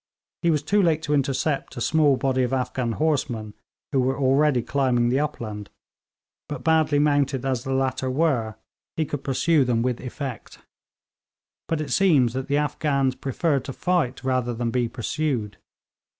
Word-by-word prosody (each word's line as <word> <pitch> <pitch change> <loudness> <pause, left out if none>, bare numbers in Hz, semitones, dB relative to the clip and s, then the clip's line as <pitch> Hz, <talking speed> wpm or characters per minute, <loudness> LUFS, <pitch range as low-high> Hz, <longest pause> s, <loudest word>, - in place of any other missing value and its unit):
He 170 - +2
was 150 -3 +1
too 205 +7 +2
late 160 -3 +2
to 150 - -1
intercept 140 0 -1
a - - -2
small 150 -1 +3
body 130 -1 0
of 125 +1 0
Afghan 125 -2 -1
horsemen, 120 -9 -1 0.4
who 135 - +2
were 130 +1 0
already 135 -1 +3
climbing 125 -3 +1
the 130 +3 +2
upland; 110 -8 -4 0.8
but 145 -4 -5
badly 160 -2 +3
mounted 145 -3 +1
as 130 -3 -1
the 135 - -4
latter 130 0 -1
were, 130 -7 0 0.4
he 160 - +1
could 145 -1 -5
pursue 145 +3 +2
them 120 -2 +1
with 125 -1 -1
effect. 130 -1 -7 1.1
But 160 -2 -1
it 155 - -5
seemed 155 -11 +4
that 130 +3 -4
the 145 - +1
Afghans 145 -3 0
preferred 140 +2 -1
to 135 - -5
fight 170 -8 -1
rather 130 -2 0
than 115 0 -2
be 120 -1 0
pursued. 120 -4 -2
135 Hz, 165 wpm, -24 LUFS, 125-150 Hz, 1.1 s, seemed